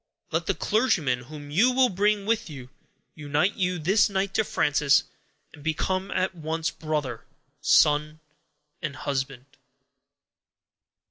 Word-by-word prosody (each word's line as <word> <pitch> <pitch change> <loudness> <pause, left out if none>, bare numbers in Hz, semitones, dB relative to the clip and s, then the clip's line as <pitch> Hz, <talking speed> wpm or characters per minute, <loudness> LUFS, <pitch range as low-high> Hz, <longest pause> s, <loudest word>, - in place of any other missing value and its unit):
Let - - -1
the - - +1
clergyman 200 - +1
whom 145 +1 -10
you 220 +12 +4
will 255 0 +4
bring 205 +1 +1
with 225 -3 0
you, 130 -4 -10 0.4
unite 150 +5 0
you 180 -1 0
this 190 +7 +3
night 195 0 -1
to 220 - +2
Frances, 145 -6 +2 0.5
and 145 - -14
become 185 +5 -1
at 185 0 -1
once, 160 -1 -3
brother, 155 -3 -3 0.4
son, 150 +1 +3 0.6
and 155 -4 -4
husband." 135 -2 -3
160 Hz, 125 wpm, -26 LUFS, 145-195 Hz, 0.6 s, you